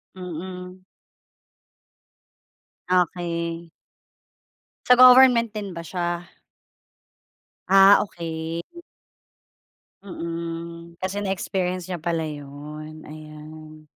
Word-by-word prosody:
Mm. 180 +1 -8 2.1
Okey. 170 -2 -1 1.2
Sa 250 - +8
government 250 -2 +7
din 205 -3 -6
ba 170 - -6
siya? 175 +1 -3 1.4
Ah, 195 +1 +7
okey. 165 -3 -5 1.4
Mm. 170 -2 -6
Kasi 185 +3 -4
na 205 - -3
experience 185 -1 -3
niya 175 - -3
pala 165 0 -1
yun, 150 +1 -8
ayan. 155 0 -12
170 Hz, 75 wpm, -23 LUFS, 160-185 Hz, 2.1 s, Sa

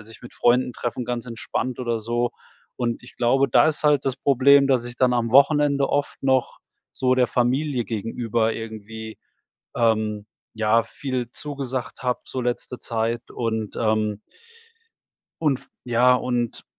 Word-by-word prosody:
sich 110 +1 -13
mit 120 - -11
Freunden 125 +1 +2
treffen, 120 0 -3
ganz 120 -1 -3
entspannt 125 +2 -3
oder 115 -2 -1
so. 120 +2 -1 0.5
Und 120 -1 -2
ich 120 - -15
glaube, 135 +3 +2
da 120 - +5
ist 155 - -2
halt 145 -2 +4
das 135 0 -1
Problem, 140 +1 +5
dass 130 -3 +2
ich 120 0 -7
dann 125 0 +3
am 115 -2 0
Wochenende 140 +1 +4
oft 145 -1 -2
noch 130 -2 +1 0.3
so 130 0 +1
der 130 -1 +3
Familie 125 +2 0
gegenüber 115 +1 -1
irgendwie, 110 0 -8 0.6
ähm, 110 -2 +1 0.3
ja, 110 +1 +2
viel 130 -4 -4
zugesagt 135 -4 -5
hab, 125 -1 -2
so 130 - -4
letzte 125 +1 -3
Zeit 115 +1 -2
und, 110 -3 -3
ähm 110 -2 0 1.2
und 140 -4 +2
f - - -12 0.2
ja 125 +1 +4
und- 120 -2 -2
120 Hz, 150 wpm, -23 LUFS, 115-130 Hz, 1.2 s, da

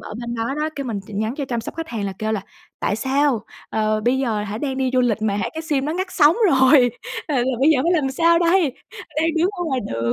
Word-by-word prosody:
ở - - -8
bên 235 0 -4
đó 230 +4 -2
đó. 305 +1 -1
Cái 275 - -3
mình 220 -5 -3
chỉ 215 - -11
nhắn 220 +4 -1
cho 285 - -2
chăm 240 -3 -2
sóc - - -8
khách 325 0 -5
hàng 220 -6 -3
là 195 - -3
kêu 220 0 -1
là 210 - -1 0.4
"Tại 205 - 0
sao, 265 -2 +1 0.3
ờ, 215 0 0
bây 245 +4 +1
giờ 225 -6 -1
hả 210 +1 -5
đang 265 0 -3
đi 260 -1 0
du 255 - +3
lịch 230 -3 +1
mà 205 -2 +1
hả 200 - -1
cái 320 - -4
sim 290 -4 -1
đó 310 - -1
ngắt 375 +2 -2
sóng 300 +3 +5
rồi, 260 -3 +5 0.4
ờ, 300 - -2
là 245 - +2
giờ 260 -1 -1
bây 295 +4 +5
giờ 290 - +4
phải 340 +3 +2
làm 285 -6 +1
sao 335 +4 +3
đây? 340 -4 +3 0.4
Đang 320 +2 +2
đứng 340 +3 +3
ở 365 -4 -5
ngoài 265 -6 -1
đường." 115 +1 0
265 Hz, 285 wpm, -21 LUFS, 220-305 Hz, 0.4 s, sóng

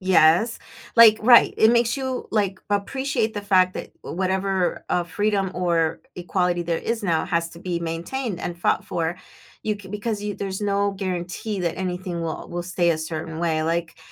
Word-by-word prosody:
Yes, 185 +4 +4 0.3
like, 225 -2 +8
right, 240 +2 +7
it 220 +1 +5
makes 235 +1 +2
you, 260 -2 -3
like, 200 -3 0
appreciate 230 +2 -1
the 205 - -2
fact 185 -2 +3
that, - - -5 0.2
eh, - - -7
whatever, 190 0 -1
uh, 175 - +1
freedom 200 +2 0
or 170 -3 0
equality 180 0 0
there 170 -1 -1
is 230 -1 -2
now 170 -5 +1
has 170 -2 0
to 170 - -12
be 175 -1 -3
maintained 170 +7 -3
and 175 0 -4
fought 175 - +1
for. 165 +1 -2 0.5
You 215 - 0
can 200 -2 -12
because 210 0 -3
you 205 -1 -3
there's 195 -1 -4
no 200 -1 +1
guarantee 190 +2 -4
that 170 -2 -1
anything 180 -2 -3
will 160 -1 -4
will 175 0 -4
stay 175 -1 +1
a 165 - +1
certain 160 0 -5
way. 160 -2 0
Like, 165 0 -2
185 Hz, 185 wpm, -23 LUFS, 170-210 Hz, 0.5 s, like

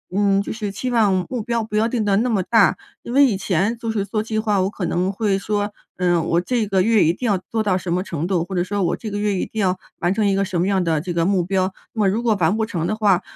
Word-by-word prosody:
嗯， 200 -1 +3
就 - - -5
是 210 -3 -4
期 250 +6 -4
望、 200 -6 +2
目 250 -3 -3
标 235 0 -1
不 215 -1 -6
要 220 +2 +3
定 230 -3 -1
得 200 -1 +2
那 240 +4 +1
么 210 -5 +1
大。 215 -3 +4 0.3
因 235 - -6
为 280 +2 +6
以 220 -8 +1
前 195 +4 0
就 230 -1 -3
是 210 -3 -1
做 210 +2 -2
计 220 -1 -2
划， 210 -3 +1
我 190 - +1
可 185 - -4
能 185 +2 0
会 200 -1 0
说： 205 +1 -2 0.3
“嗯， 175 -2 +1
我 170 +1 +2
这 230 +4 0
个 195 -1 +2
月 220 +1 +4
一 165 - +3
定 245 - -6
要 200 -3 +2
做 220 +4 -3
到 195 -3 +1
什 180 -2 -3
么 180 - +1
程 165 -4 -4
度， 180 -2 0
或 190 +2 -6
者 175 - +1
说 200 +2 -2
我 170 - +1
这 215 -3 -6
个 205 - -3
月， 205 -1 0
一 - - -1
定 220 - -4
要， 185 -1 +1 0.2
完 175 0 +1
成 210 +1 0
一 200 - +2
个 195 - +1
什 190 -3 -2
么 175 - +2
样 195 -2 +1
的 160 -2 +1
这 175 +3 -4
个 170 -1 +1
目 190 -1 +2
标。 190 0 0 0.2
那 220 - -6
么 200 -2 +4
如 225 +5 -1
果 225 -3 +2
完 185 +6 +2
不 220 - +1
成 175 -7 -3
的 215 - -1
话， 205 -4 +3
200 Hz, 330 characters per minute, -21 LUFS, 185-220 Hz, 0.3 s, 为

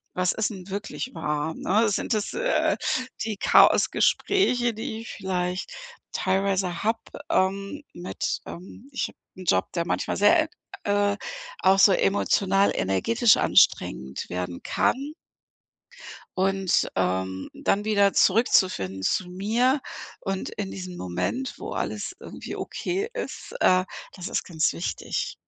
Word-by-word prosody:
was 180 0 +2
ist 220 - 0
'n 190 -4 -9
wirklich 210 +6 -5
wahr, 150 +1 -2
ne? 215 +3 +2
Sind 210 - 0
das, 210 -1 -2
äh, - - +1 0.5
die 220 -2 -3
Chaosgespräche, 250 - +4
die 220 0 -5
ich 230 - -9
vielleicht 180 - -3 0.4
teilweise 190 -2 0
habe, 225 +2 +1 0.3
ähm, 195 +7 0
mit, 175 +1 -3
ähm 190 +8 -10
ich 265 - -1
habe - - -16 0.2
'n 185 - -10
Job, 95 - +2
der 170 -2 -1
manchmal - - -1
sehr, 315 - +6
ä 320 - -6 0.4
äh, 205 0 +2 0.4
auch 195 +1 +4
so 195 - +8
emotional 195 0 +2
energetisch 95 - +3
anstrengend 65 +2 +2
werden 90 -1 -4
kann. 280 +3 0 1.2
Und, 195 0 +2
ähm, 95 0 -1
dann 205 +1 0
wieder 200 -2 +4
zurückzufinden 185 - +3
zu 180 - 0
mir 235 +9 +1 0.4
und 195 -1 -3
in 200 -2 -5
diesem 185 -1 -7
Moment, 90 - -2
wo - - -6
alles - - -3
irgendwie - - -8
okay 390 +4 -3
ist, - - -6
äh, 185 0 +4 0.3
das 180 -1 -6
ist - - -1
ganz 160 -3 0
wichtig. 170 - -3
195 Hz, 130 wpm, -25 LUFS, 175-220 Hz, 1.2 s, so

